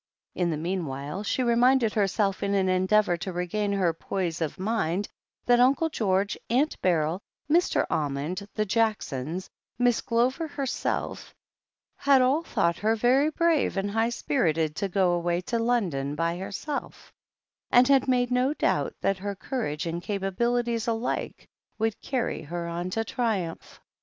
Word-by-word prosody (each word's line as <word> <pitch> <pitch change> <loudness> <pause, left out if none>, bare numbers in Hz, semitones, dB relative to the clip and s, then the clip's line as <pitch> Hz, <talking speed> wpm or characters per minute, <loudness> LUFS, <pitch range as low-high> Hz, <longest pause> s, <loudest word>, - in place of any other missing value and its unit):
In 180 -2 0
the 160 - -1
meanwhile, 155 -1 -3
she 235 +5 -1
reminded 240 -1 +3
herself, 195 -1 +1
in 200 0 0
an 190 -1 +2
en 185 0 +1
deavour 210 -4 +3
to 190 +2 -4
regain 180 +4 -1
her 185 -4 +2
poise 170 -1 -3
of 160 - -2
mind, 195 -2 -1 0.4
that 245 0 +4
Uncle 275 +6 +4
George, 200 -6 0
Aunt 270 +7 +2
Beryl, 170 0 +1 0.3
Mr. 335 +4 +2
Almond, 150 +7 -2
the 215 - +1
Jacksons, 190 - -1 0.3
Miss 245 -1 +2
Glover 255 +7 0
herself, 280 -5 -3 0.6
had 280 -1 +4
all 260 +5 +3
thought 170 - 0
her 220 +2 +2
very 255 +6 +3
brave 325 - +1
and 200 +1 -1
high 225 +2 +1
spirited 165 - 0
to 200 - -1
go 185 -1 +2
away 175 0 0
to 235 +5 -2
London 180 - 0
by 165 +2 0
herself, 200 +10 -6 0.6
and 245 +1 +6
had 275 -1 +4
made 250 -1 +2
no 255 +4 +2
doubt - - 0
that 195 -1 +1
her 200 +1 -4
courage 190 - -3
and 170 +1 -3
capabilities 230 +5 -1
alike 230 +1 -2 0.3
would 225 -1 -1
carry 260 -3 -2
her 170 +3 -5
on 170 +2 -3
to 225 +4 -1
triumph. 210 -9 -3
205 Hz, 150 wpm, -27 LUFS, 175-245 Hz, 0.6 s, and